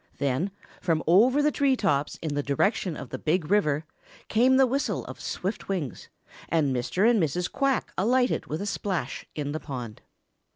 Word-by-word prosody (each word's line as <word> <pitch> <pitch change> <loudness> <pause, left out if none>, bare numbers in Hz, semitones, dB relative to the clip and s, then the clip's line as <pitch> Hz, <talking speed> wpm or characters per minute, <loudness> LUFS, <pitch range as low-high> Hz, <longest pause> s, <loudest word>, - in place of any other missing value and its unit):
Then, 140 +6 0 0.3
from 165 -3 +1
over 240 - +5
the 300 - +3
tree 280 -3 +2
tops 150 - 0
in 155 -3 -2
the 145 - 0
direction 160 - 0
of - - -8
the - - -5
Big 165 +1 0
River, 155 -7 +2 0.4
came 255 +4 +4
the 265 - +6
whistle 270 +3 -1
of - - -9
swift 195 +3 -4
wings, 170 - -3 0.4
and 145 -5 +2
Mr. 125 - +1
and 235 -4 +4
Mrs. 175 +3 -1
Quack 275 -2 0
alighted 250 +5 +2
with 155 +6 -3
a - - -3
splash 185 -9 -3
in 145 -1 -3
the 155 - -3
pond. 125 -8 -7
180 Hz, 175 wpm, -27 LUFS, 145-230 Hz, 0.4 s, the